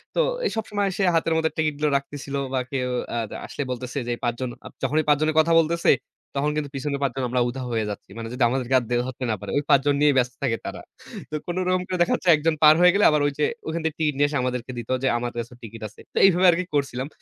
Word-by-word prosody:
তো - - +1 0.3
এই - - +1
সবসময় 205 -2 -1
সে 195 - +1
হাতের 165 0 +2
মধ্যে 160 0 +1
টিকিটগুলো 155 -1 0
রাখতেছিল 140 0 -7 0.2
বা, 130 - +1
কেউ 125 -2 -1 0.3
আদ 110 -2 -2 0.2
আসলে 145 - -4
বলতেছে 125 +1 -5
যে, - - -3
এই - - -18
৫ 120 - +1
জন 130 - -1 0.2
আব - - -9
যখনই 155 +1 +2
৫ 145 -1 +5
জনের 155 0 +1
কথা 165 +1 +3
বলতেছে, 165 +1 +2 0.4
তখন 145 +2 +1
কিন্তু 145 -2 -2
পিছনের 140 +1 -2
৫ 135 - +1
জন, 135 - -2
আমরা 125 0 +1
উধাও 130 0 -5
হয়ে 110 -1 0
যাচ্ছি। 100 - -7
মানে 115 0 -5
যদি 125 0 0
আমাদেরকে 130 0 0
আর - - -7
দে 120 - +1
ধরতে 130 0 -6
না - - +1
পারে। - - -6
ওই 145 - +1
৫ 140 - +7
জন 145 -1 +3
নিয়েই 145 -2 +4
ব্যস্ত 125 -1 +2
থাকে 115 -4 +1
তারা। - - -6 0.5
তো - - -3
কোন 175 - -3
রকম 185 0 +2
করে 185 - -2
দেখা 175 - +3
যাচ্ছে 180 - -1
১ 150 - -5
জন 165 -1 +3
পার 150 0 +9
হয়ে 180 0 +7
গেলে, 205 - +3
আবার 150 -1 +2
ওইযে 145 +1 -2 0.2
ওখান 165 +1 -2
থেকে 160 -1 -1
টিকিট 150 -2 +1
নিয়ে 145 0 +4
এসে 145 - -1
আমাদেরকে 125 0 -3
দিত 120 - -6
যে, 135 - +2
আমার 120 0 -3
কাছে 120 +1 -5
টিকিট 115 0 -9
আছে। 105 - -19
তো - - -7
এইভাবে 185 -1 +4
আরকি 180 +2 -1
করছিলাম। 135 -2 -1
145 Hz, 265 wpm, -24 LUFS, 125-160 Hz, 0.5 s, পার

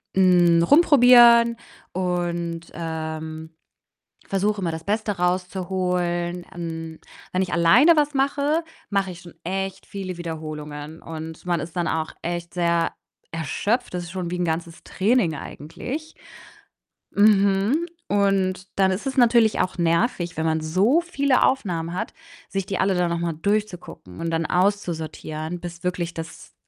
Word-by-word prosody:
hm, 175 -3 +5
rumprobieren 240 - +7 0.4
und, 175 -2 -2
ähm, 160 -1 -5 0.8
versuche 200 +1 0
immer, 170 - -1
das 160 0 -6
Beste 210 +1 0
rauszuholen. 180 -1 -1
Hm, 165 -1 -6 0.3
wenn 185 +1 +1
ich 180 - -3
alleine 225 - +6
was 295 -1 +2
mache, 285 +4 +1 0.3
mache 195 -2 0
ich 175 - -11
schon 175 -4 -13
echt 190 +2 -3
viele 185 -3 -6
Wiederholungen, 155 -2 -6
und 160 0 -8
man 175 -3 +1
ist 160 +3 -8
dann 175 -2 0
auch 160 -1 -2
echt 175 0 -4
sehr 170 -1 +1 0.4
erschöpft. 200 - -1
Das 175 -1 -3
ist 175 - -9
schon 185 -2 -4
wie 180 - -3
'n 180 - 0
ganzes 165 0 -3
Training 200 -5 +1
eigentlich 255 - -7 1.0
Mhm. 205 - +3 0.2
Und 195 -2 +1
dann 190 -1 +4
ist 190 +8 -3
es 270 - -2
natürlich 235 -3 +4
auch 180 0 0
nervig, 175 +1 0
wenn 160 +1 -1
man 160 0 +1
so 195 - +3
viele 280 -6 +1
Aufnahmen 170 -10 0
hat, 180 - -4 0.3
sich 195 -1 -2
die 195 0 -3
alle 195 0 +2
dann 180 -1 +1
noch 170 - -1
mal 170 -1 -2
durchzugucken 180 - -3
und 165 - -2
dann 165 0 0
auszusortieren, 175 -3 -2
bis 175 0 -8
wirklich 175 -1 -2
das 165 0 -9
180 Hz, 145 wpm, -23 LUFS, 165-200 Hz, 1.0 s, rumprobieren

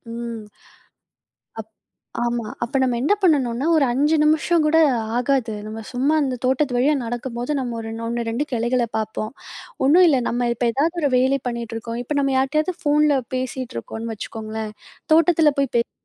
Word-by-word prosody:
ம். 235 -1 -5 1.2
அப் 220 0 -8 0.5
ஆமா. 240 -1 -1 0.2
அப்ப 235 +3 -1
நம்ம 250 -2 +1
என்ன 290 +10 +3
பண்ணணும்னா? 275 -8 +2
ஒரு 290 - +4
5 295 +5 +2
நிமிஷம் 315 +2 +3
கூட 310 +1 +3 0.4
ஆகாது, 250 -2 0
நம்ம 215 +1 -6
சும்மா 260 +4 +1
அந்த 265 -3 -1
தோட்டத்து 260 0 +1
வழியா 280 +5 +3
நடக்கும்போது, 240 +2 -4
நம்ம 245 -3 -3
ஒரு 225 0 -6 0.2
1, 235 0 -2
2 240 +6 -1
கிளைகள 240 +1 +1
பார்ப்போம். 220 0 -3 0.5
ஒன்னும் 340 +7 +6
இல்ல, 280 -5 +4
நம்ம 240 +1 0
இப்ப 240 +1 -1
எதாவது 320 +7 0
ஒரு 285 - +3
வேலை 265 +2 +2
பண்ணிட்டு 235 -2 -4
இருக்கோம், 230 +1 -5
இப்ப 290 +4 -3
நம்ம 275 -1 +1
யார்ட்டயாவது 305 +7 +1
ஃபோன்ல 295 -1 +3 0.2
பேசிட்டுருக்கோன்னு 240 - -5
வச்சுக்கோங்களேன், 220 0 -6 0.4
தோட்டத்தில 325 -1 +4
போய் 275 -3 0
பேசுவோம். 235 - 0
255 Hz, 155 wpm, -22 LUFS, 235-290 Hz, 1.2 s, ஒன்னும்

